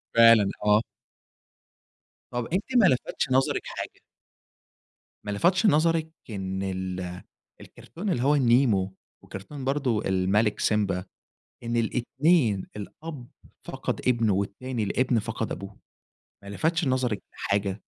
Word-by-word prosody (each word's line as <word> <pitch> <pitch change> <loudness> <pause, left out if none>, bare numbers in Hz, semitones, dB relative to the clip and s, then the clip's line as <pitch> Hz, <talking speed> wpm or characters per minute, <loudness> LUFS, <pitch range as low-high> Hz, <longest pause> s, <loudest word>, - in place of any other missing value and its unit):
فعلًا. 115 -3 +7 0.2
آه. 105 +1 +5 1.5
طَب 120 -1 -2
أنتِ 195 - +1
ما 220 - +6
لفتش 130 -3 +1
نظرِك 130 +1 +2
حاجة؟ - - -6 1.3
ما 105 - -3
لفتش 180 - +2
نظرِك 160 -2 +3 0.2
إن 95 -2 -4
ال 95 -1 -4 0.4
الكرتون 195 +5 -7
اللي 125 -7 0
هو 145 +2 +4
النيمو، 115 -7 +3 0.3
وكرتون 130 +9 -8
برضو 135 -6 0
الملك 95 +3 +1
سيمبا 100 -4 +1 0.6
إن 120 0 -2
الاتنين 120 - +2
الأب 130 +5 -8 0.4
فَقَد - - -3
ابنه، 115 -4 +3
والتاني 110 +5 -3
الابن 125 +3 +1
فَقَد 115 +1 -3
أبوه، 100 +2 -8 0.7
ما 100 - -10
لفتش 160 +10 0
نظرِك 125 -6 0
لحاجة؟ 100 -1 -1
115 Hz, 115 wpm, -26 LUFS, 100-135 Hz, 1.5 s, فعلًا